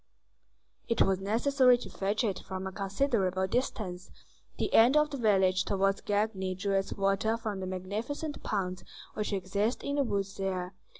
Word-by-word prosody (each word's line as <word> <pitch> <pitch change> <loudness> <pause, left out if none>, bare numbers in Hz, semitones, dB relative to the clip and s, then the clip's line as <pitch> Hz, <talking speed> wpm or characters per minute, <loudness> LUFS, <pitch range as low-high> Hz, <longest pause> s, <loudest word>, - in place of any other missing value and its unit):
It 230 - +3
was 190 -1 +1
necessary 250 +5 +4
to 240 - -8
fetch 205 +5 -1
it 200 -5 -1
from 190 0 -6
a 190 - -4
considerable 195 -2 0
distance; 190 -4 -3 0.5
the - - -2
end 245 +6 +6
of 300 0 +3
the 280 - -3
village 190 -5 +3
towards 195 0 +1
Gagny 205 -3 -1
drew 200 +2 -2
its 195 0 0
water 195 +3 +1
from 215 -4 -4
the 185 - -4
magnificent 215 - -4
ponds 185 -3 -2 0.3
which 210 0 -3
exist 200 +4 -1
in 285 +1 -2
the 285 - +3
woods 200 -4 -2
there. 185 -1 -2
200 Hz, 165 wpm, -30 LUFS, 190-230 Hz, 0.5 s, end